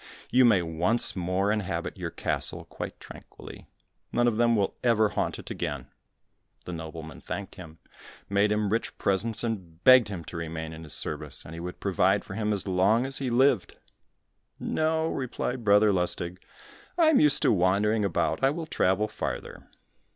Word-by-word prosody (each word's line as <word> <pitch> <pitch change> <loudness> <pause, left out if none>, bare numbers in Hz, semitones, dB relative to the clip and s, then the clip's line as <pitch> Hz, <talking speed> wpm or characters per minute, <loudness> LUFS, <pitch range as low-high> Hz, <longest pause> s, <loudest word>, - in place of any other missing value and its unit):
You 130 0 +5
may 100 -7 +4
once 85 +8 +1
more 95 +2 0
inhabit 105 -3 -3
your - - -5
castle - - -2
quite - - -7
tranquilly, - - -12 0.4
none 120 0 +2
of 115 -2 +1
them 120 0 +3
will 100 -3 0
ever 110 -3 +3
haunt - - -2
it - - -9
again." 70 -4 -4 0.8
The 90 - -6
nobleman 80 -2 -8
thanked 100 -2 -6
him, 80 -3 -12 0.5
made 100 +1 +2
him 105 -1 0
rich 115 +2 -2
presents, 105 +4 +1
and 95 -8 -5
begged 130 -3 +7
him 95 -5 -6
to 85 - -8
remain 80 -1 -5
in 80 +1 -9
his 75 - -3
service, - - -4
and 80 - -9
he 85 - -7
would 90 +1 -7
provide 95 +1 +1
for - - -8
him 105 +1 -1
as 100 -1 +1
long 100 +6 +2
as 135 0 -2
he 135 -2 -2
lived. 125 -3 +2 0.8
"No," 160 0 0
replied 125 -3 -3
Brother 105 0 +5
Lustig, 90 0 -1 0.6
"I 330 -2 +5
am 310 - +5
used 150 -2 +4
to - - +4
wandering 105 +3 +2
about, 100 - -1
I 135 - +5
will 160 +3 -4
travel 100 -7 +1
farther." 105 - -6
100 Hz, 175 wpm, -27 LUFS, 90-120 Hz, 0.8 s, begged